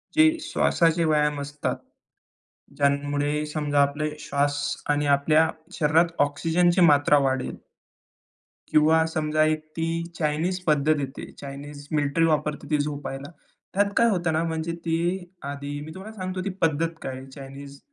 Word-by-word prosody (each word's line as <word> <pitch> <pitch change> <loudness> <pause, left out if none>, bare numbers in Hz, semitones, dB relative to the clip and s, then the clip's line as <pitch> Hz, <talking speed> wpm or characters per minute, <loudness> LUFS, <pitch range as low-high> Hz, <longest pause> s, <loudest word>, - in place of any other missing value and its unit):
जे 315 +1 +5
श्वासाचे 165 0 +2
व्यायाम 150 -2 +2
असतात, 145 +1 -3 1.0
ज्यामुळे 145 +1 +1
समजा 145 -2 +1
आपले 145 +2 0
श्वास 145 0 0 0.3
आणि 145 0 +2
आपल्या 155 +3 +3 0.3
शरीरात 160 +2 +4 0.2
ऑक्सिजनची 170 +5 +2
मात्रा 145 -3 +5
वाढेल. 130 -1 -2 1.1
किंवा 160 +1 +4
समजा 155 -1 +1
एक 155 0 0
ती 165 0 -1 0.3
चाइनिज 160 +4 -1
पद्धत 150 0 +3
येते, 135 -1 -6
चाइनिज 145 +1 -9
मिलिटरी 150 +2 +2
वापरते 150 -1 0
ती 150 - +2
झोपायला. 145 0 -4 0.4
त्यात 200 +1 +2
काय 235 0 +5
होतं 175 -5 0
ना, 160 +1 +1
म्हणजे 160 0 -2
ती 165 0 +1 0.5
आधी 145 0 -5
मी 160 - -9
तुम्हाला 210 +4 -9
सांगतो 185 -1 -3
ती - - 0
पद्धत 165 +1 +1
काय, 130 0 -6
चाइनिज 140 0 -10
150 Hz, 135 wpm, -25 LUFS, 145-165 Hz, 1.1 s, जे